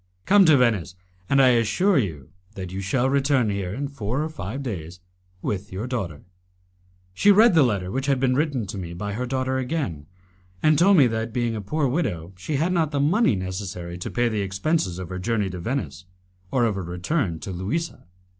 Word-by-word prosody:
Come 200 -1 +6
to 155 -4 +6
Venice, 110 -8 +1 0.3
and 140 - +4
I 130 -1 +7
assure 125 - +3
you 80 - -4 0.2
that 95 -2 -6
you 95 +1 -4
shall 120 +7 +1
return 135 -4 +2
here 100 -3 -3
in 140 +7 -3
four 135 0 -3
or 160 - -3
five 120 0 -6
days 90 -8 -6 0.4
with 100 -1 -3
your 95 +5 -4
daughter." 100 - -4 0.9
She 205 - +5
read 215 +2 +6
the 160 - +6
letter 100 -8 +1
which 135 +4 -2
had 135 -2 +2
been 130 -1 +2
written 140 -4 0
to 95 +1 -6
me 85 -2 -6
by 105 +3 -4
her 125 +4 -3
daughter 130 0 -1
again, 125 - -3 0.6
and 155 0 +5
told 195 +2 +6
me 140 - +7
that, 115 0 -1
being 120 -1 -1
a 105 - -4
poor 145 +8 0
widow, 95 - -2
she 95 - -4
had 165 +6 +1
not 165 -4 +1
the 145 -2 -2
money 150 - +3
necessary 95 -2 -5
to - - -4
pay 120 0 +1
the 110 -3 -1
expenses 100 - -1
of 90 -2 -6
her 95 0 -5
journey 105 -1 -1
to 90 - -6
Venice, 115 -2 -4 0.4
or 120 +2 +2
of 110 - +1
her 95 -1 -4
return 90 - -2
to 95 - -5
Louisa. 100 - -4
115 Hz, 205 wpm, -24 LUFS, 95-140 Hz, 0.9 s, I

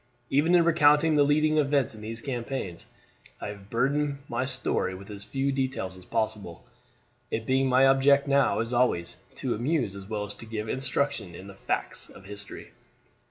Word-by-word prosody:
Even 155 +6 +4
in 175 - +6
recounting 155 -1 +5
the 150 - +4
leading 155 +2 +3
events 140 -4 +2
in 110 - -11
these 115 +2 -5
campaigns, 120 - -4 0.5
I - - -5
have 100 -1 -10
burdened 140 +5 +1
my 120 +2 -1
story 125 -7 -1
with 100 +2 -10
as 100 -1 -7
few 135 0 -1
details 130 -8 -2
as 90 -1 -14
possible, 100 -6 -3 0.6
it 110 0 -3
being 130 +1 +2
my 130 +1 +5
object 140 +1 +5
now, 140 -7 +3
as 115 +2 -2
always, 120 -9 +1 0.2
to - - -1
amuse 120 -3 0
as 100 -1 -9
well 105 -1 -2
as 100 - -7
to 115 - -12
give 110 -1 -4
instruction 130 -7 -1
in 95 - -10
the 100 - -10
facts 95 - -3
of 95 - -14
history. 100 0 -7
125 Hz, 180 wpm, -27 LUFS, 105-140 Hz, 0.6 s, in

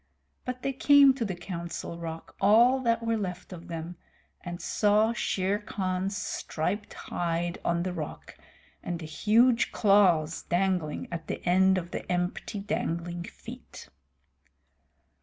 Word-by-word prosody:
But 250 0 -5
they 275 - -1
came 280 +1 +6
to 260 -3 -3
the 195 -4 -3
Council 170 -1 -6
Rock, 165 -1 -7
all 235 +6 +6
that 230 -2 0
were 230 0 +1
left 180 -2 -5
of 170 -2 -10
them, 165 +1 -6 0.5
and 175 0 -6
saw 215 +2 +2
Shere 195 -3 0
Khan's 195 -2 -2
striped 205 +6 -3
hide 170 0 -2
on 170 0 0
the 185 0 -3
rock, 155 -4 -7 0.5
and 175 -1 -3
the 165 - -8
huge 230 +9 +3
claws 180 -6 +3
dangling 180 -4 -1
at 165 -1 -5
the - - -5
end 190 +1 +4
of 175 -1 -4
the - - -5
empty 180 +4 -2
dangling 175 -3 -3
feet. - - -11
185 Hz, 140 wpm, -28 LUFS, 170-215 Hz, 0.5 s, came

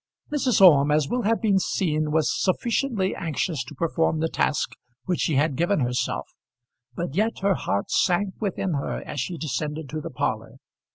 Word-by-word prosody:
Mrs. 255 -8 +2
Orme, 150 -6 +7
as 150 -1 +2
will 245 +9 -1
have 225 +1 +2
been 200 -3 +4
seen, 155 -5 0
was 155 0 +2
sufficiently 215 0 0
anxious 160 -2 -2
to 150 - -11
perform 160 +1 0
the 160 +1 0
task 150 - 0 0.3
which 180 -2 -1
she 155 - +1
had 145 +1 +2
given 175 +3 +1
herself, 125 0 -1 0.7
but 170 -1 -3
yet 215 +5 0
her 200 0 +4
heart 100 - -2
sank 190 +2 +2
within 195 -3 -2
her 140 - -3
as 145 - -5
she 170 +7 -3
descended 150 0 -3
to 155 +2 -4
the - - -6
parlour. - - -3
165 Hz, 175 wpm, -25 LUFS, 150-195 Hz, 0.7 s, Orme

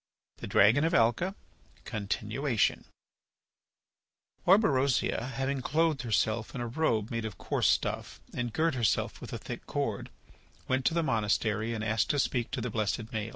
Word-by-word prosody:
THE - - -7
DRAGON 115 +9 +5
OF 165 +1 +2
ALCA 120 - +2 0.5
(Continuation) 110 +3 -1 1.6
Orberosia, 140 - +3
having 135 +2 -1
clothed 155 +2 +1
herself 110 -1 0
in 125 - -3
a - - -2
robe 115 -4 0
made 115 -1 -2
of 110 -3 -5
coarse - - 0
stuff - - -1
and 120 -1 -2
girt 160 +6 +1
herself 120 -5 0
with - - -8
a - - -3
thick - - -8
cord, - - -2 0.6
went 130 0 0
to 165 - +2
the 170 - +2
monastery 110 -2 0
and 110 - -4
asked 110 -1 +1
to 145 - +2
speak 125 -3 0
to 125 -1 -3
the 125 0 -3
blessed 110 +1 -1
Maël. 110 -1 -3
120 Hz, 155 wpm, -30 LUFS, 110-140 Hz, 1.6 s, DRAGON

